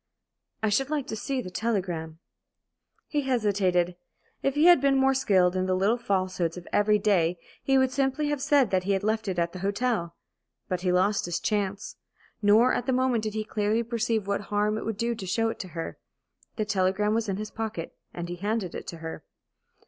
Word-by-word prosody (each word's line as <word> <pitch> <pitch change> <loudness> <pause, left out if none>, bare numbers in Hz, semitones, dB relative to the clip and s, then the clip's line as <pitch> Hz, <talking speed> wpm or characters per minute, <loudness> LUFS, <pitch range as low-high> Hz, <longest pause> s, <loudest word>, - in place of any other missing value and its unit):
"I 220 - +3
should 270 +6 +1
like 300 -3 -1
to - - -3
see 260 +3 -2
that 185 - -8
telegram." 180 -8 -2 0.9
He 295 - 0
hesitated. 195 -9 +1 0.4
If 275 0 0
he 300 +2 +4
had 350 -6 +7
been 275 -1 +3
more 270 0 +4
skilled 190 -8 +3
in 185 0 0
the 185 - +2
little 205 +6 +2
falsehoods 185 -5 -1
of 175 - -9
every 210 0 +4
day 180 -5 +2 0.2
he 270 0 +2
would 260 -1 +3
simply 275 +2 0
have 295 -2 -1
said 275 -6 +3
that 185 -1 +1
he 200 - +2
had 195 +1 -1
left 220 0 0
it 185 -2 -2
at 170 0 0
the 185 - -7
hotel. 200 -2 -1 0.5
But 180 -1 -2
he 180 -1 +1
lost 190 +3 +2
his 175 -1 -2
chance. 205 -1 -2 0.4
Nor 220 +5 +5
at 245 - -2
the 260 - +2
moment 250 -3 +1
did 215 0 -3
he 215 - -1
clearly 215 +1 0
perceive 230 -2 -1
what 200 0 -1
harm 210 +1 0
it - - -7
would 220 -2 -3
do 235 +2 0
to 215 -4 -7
show 225 +4 +1
it - - -6
to 185 - -5
her. 165 - -5 0.6
The 215 - -1
telegram 200 +1 +1
was 225 -1 0
in 195 - -1
his 215 0 -5
pocket, 220 -7 -5 0.2
and 175 0 -5
he 175 0 -5
handed 205 -1 -2
it - - -7
to 170 - -6
her. 160 - -6
210 Hz, 210 wpm, -27 LUFS, 185-235 Hz, 0.9 s, had